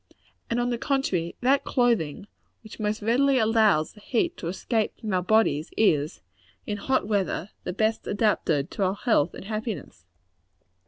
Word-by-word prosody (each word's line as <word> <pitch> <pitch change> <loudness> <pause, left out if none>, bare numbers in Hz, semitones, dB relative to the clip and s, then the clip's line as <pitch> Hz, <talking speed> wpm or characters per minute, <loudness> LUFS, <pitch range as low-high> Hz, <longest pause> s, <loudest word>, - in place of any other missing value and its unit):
And, 235 - 0
on 245 0 0
the 235 - -2
contrary, 195 -13 -1
that 270 +3 +3
clothing 230 - +1 0.4
which 220 0 -12
most 210 0 -2
readily 265 +5 +3
allows 220 -8 +3
the 210 - -16
heat 265 - -1
to 165 - -5
escape 215 +5 -2
from 215 -3 -4
our 180 - +2
bodies, 180 -6 +2
is, 155 -8 +2 0.4
in 210 - -3
hot 260 +1 0
weather, 200 -2 -1
the 180 - -3
best 220 +3 0
adapted 200 -9 +1
to 200 - -2
our 190 +1 +1
health 205 - +1
and - - -9
happiness. 215 - -5
215 Hz, 160 wpm, -26 LUFS, 180-235 Hz, 0.4 s, that